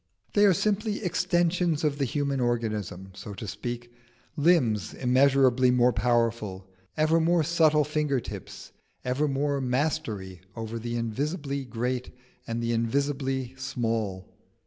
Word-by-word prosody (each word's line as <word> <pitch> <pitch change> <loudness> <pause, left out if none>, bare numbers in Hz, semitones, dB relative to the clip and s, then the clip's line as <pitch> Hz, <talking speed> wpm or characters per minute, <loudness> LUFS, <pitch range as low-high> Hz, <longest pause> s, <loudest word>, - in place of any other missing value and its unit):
They 205 0 +6
are 195 - +6
simply 215 +2 0
extensions 175 -2 +1
of 145 -1 0
the 140 - +2
human 140 +1 -1
organism, 110 -6 -2
so 100 +1 -8
to 105 - -7
speak, 120 +4 -5 0.4
limbs 135 - +2
immeasurably 130 0 +4
more 125 0 +4
powerful, 115 -4 0 0.3
ever 155 +2 +3
more 165 0 +3
subtle 155 -1 +4
finger 150 -2 0
tips, - - -9 0.3
ever 130 +4 +1
more 140 0 0
mastery 125 - -2
over 115 0 -5
the 120 +1 -4
invisibly 140 - -2
great 125 +2 -2 0.4
and 115 0 -2
the 115 - 0
invisibly 130 +2 -1
small. 115 -7 -2
130 Hz, 125 wpm, -27 LUFS, 115-150 Hz, 0.4 s, They